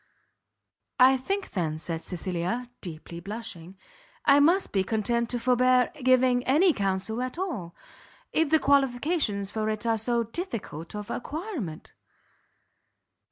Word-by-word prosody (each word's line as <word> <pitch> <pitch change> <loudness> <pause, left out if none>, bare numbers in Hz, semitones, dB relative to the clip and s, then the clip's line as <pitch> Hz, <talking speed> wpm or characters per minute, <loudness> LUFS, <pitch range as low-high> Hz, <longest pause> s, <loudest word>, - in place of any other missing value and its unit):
"I 260 +1 +7
think, 390 +10 -3
then," 160 -5 -1
said 165 0 -5
Cecilia, 185 +7 -3
deeply 170 -1 -7
blushing, 195 -2 -8 0.5
"I 280 0 +7
must 345 +7 +3
be 195 -2 +2
content 230 +3 0
to 245 - -2
forbear 250 +1 +3
giving 255 -1 +4
any 320 +7 +4
counsel 195 +3 -1
at 255 +4 -4
all, 255 - -4 0.6
if 320 -2 +2
the 315 - +5
qualifications 270 - +1
for 220 -1 -1
it 215 +1 -3
are 225 -1 +2
so 235 +1 +1
difficult 230 - -5
of 210 0 -6
acquirement." 295 - -5
235 Hz, 125 wpm, -27 LUFS, 195-265 Hz, 0.6 s, I